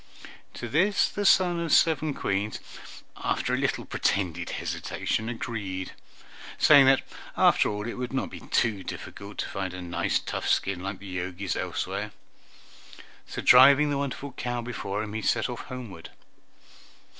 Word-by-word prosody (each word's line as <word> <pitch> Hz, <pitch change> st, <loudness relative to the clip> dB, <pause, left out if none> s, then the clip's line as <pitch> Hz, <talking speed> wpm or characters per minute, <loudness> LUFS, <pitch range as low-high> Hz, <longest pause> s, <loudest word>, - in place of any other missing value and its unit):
To 120 Hz, -, -5 dB
this 185 Hz, -, +2 dB
the 205 Hz, -1 st, -1 dB
son 175 Hz, -3 st, +4 dB
of 170 Hz, -1 st, -2 dB
seven 155 Hz, -2 st, +3 dB
Queens, 100 Hz, +2 st, -2 dB, 0.6 s
after -, -, -1 dB
a -, -, +2 dB
little -, -, -1 dB
pretended 85 Hz, -3 st, -1 dB
hesitation, 110 Hz, +1 st, -3 dB
agreed, 100 Hz, -6 st, -4 dB, 0.7 s
saying 140 Hz, -3 st, +7 dB
that 135 Hz, 0 st, +5 dB, 0.3 s
after -, -, +4 dB
all 105 Hz, 0 st, -4 dB
it 120 Hz, -, -5 dB
would 125 Hz, -1 st, -3 dB
not 135 Hz, -, -2 dB
be -, -, -8 dB
difficult 100 Hz, -1 st, -3 dB
to -, -, -3 dB
find 95 Hz, -2 st, -4 dB
a 90 Hz, -, -7 dB
nice 85 Hz, 0 st, 0 dB
tough -, -, -4 dB
skin 95 Hz, -2 st, +1 dB
like 95 Hz, +1 st, -4 dB
the 95 Hz, -2 st, -9 dB
Jogi's 90 Hz, +2 st, -3 dB
elsewhere; -, -, -3 dB, 1.1 s
so -, -, -6 dB
driving 140 Hz, +3 st, +7 dB
the 140 Hz, -, 0 dB
wonderful 140 Hz, 0 st, -4 dB
cow 120 Hz, 0 st, -3 dB
before 110 Hz, -3 st, -4 dB
him, 105 Hz, -1 st, -7 dB
he 110 Hz, -, -3 dB
set 110 Hz, +1 st, +1 dB
off 120 Hz, -, -6 dB
homeward. 115 Hz, -10 st, -8 dB
115 Hz, 150 wpm, -27 LUFS, 95-135 Hz, 1.1 s, saying